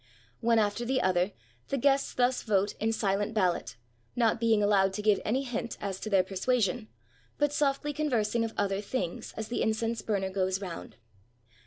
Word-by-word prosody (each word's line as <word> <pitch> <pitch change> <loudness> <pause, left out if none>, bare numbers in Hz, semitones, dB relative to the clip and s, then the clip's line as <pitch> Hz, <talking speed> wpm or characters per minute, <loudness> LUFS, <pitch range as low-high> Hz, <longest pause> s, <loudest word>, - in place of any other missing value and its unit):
One 230 0 +3
after 210 +2 +1
the 260 +2 +1
other 185 -2 +2 0.4
the 275 - -1
guests 275 +1 +2
thus 250 0 +2
vote 205 -2 +1
in 225 +1 +1
silent 205 0 0
ballot, 185 - 0 0.4
not 230 -2 +2
being 225 -2 +3
allowed 195 -2 +3
to 210 - -4
give 210 -2 +3
any 255 +6 0
hint 240 -2 -4
as 195 -2 -4
to 215 - -5
their 195 -3 +4
persuasion, 215 +3 0 0.5
but 290 0 +1
softly 290 0 0
convers 255 -8 0
ing 235 -1 +2
of 225 -1 -4
other 200 -1 0
things 200 -5 -4
as 220 -1 -4
the 240 - -1
incense 225 +1 0
burner 195 -3 -1
goes 190 0 0
round. 185 -4 -7
215 Hz, 180 wpm, -29 LUFS, 195-240 Hz, 0.5 s, their